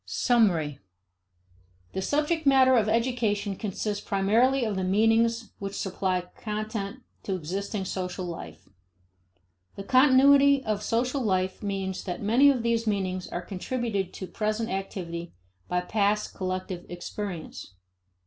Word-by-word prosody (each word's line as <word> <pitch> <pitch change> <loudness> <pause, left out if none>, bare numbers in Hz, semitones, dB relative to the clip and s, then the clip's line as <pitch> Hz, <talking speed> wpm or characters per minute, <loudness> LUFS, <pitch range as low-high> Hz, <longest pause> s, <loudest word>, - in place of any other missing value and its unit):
Summary. 175 - +2 1.1
The 190 - -2
subject 300 - 0
matter 260 -1 +6
of 215 -3 +3
education 220 -4 0
consists 205 +1 -3
primarily 230 +6 +2
of 215 -2 -2
the 190 - -1
meanings 225 +4 +2
which 195 0 -5
supply 185 -1 -1 0.2
content 215 +2 -4 0.2
to 195 - -2
existing 190 +4 -4
social 185 0 -4
life. 85 - -8 1.1
The 195 - -6
continuity 275 +3 +6
of 215 -1 -1
social 250 +5 0
life 185 -4 0
means 195 -2 -3
that 180 -2 -4
many 240 +7 +5
of 255 -4 +1
these 230 -1 0
meanings 185 -3 -1
are 175 - -5
contributed 200 -1 -3
to 190 - -5
present 215 +3 -2
activity 175 - -5 0.3
by 180 0 0
past 205 +2 0
collective 185 -1 -4
experience. 175 - -6
205 Hz, 125 wpm, -27 LUFS, 185-235 Hz, 1.1 s, matter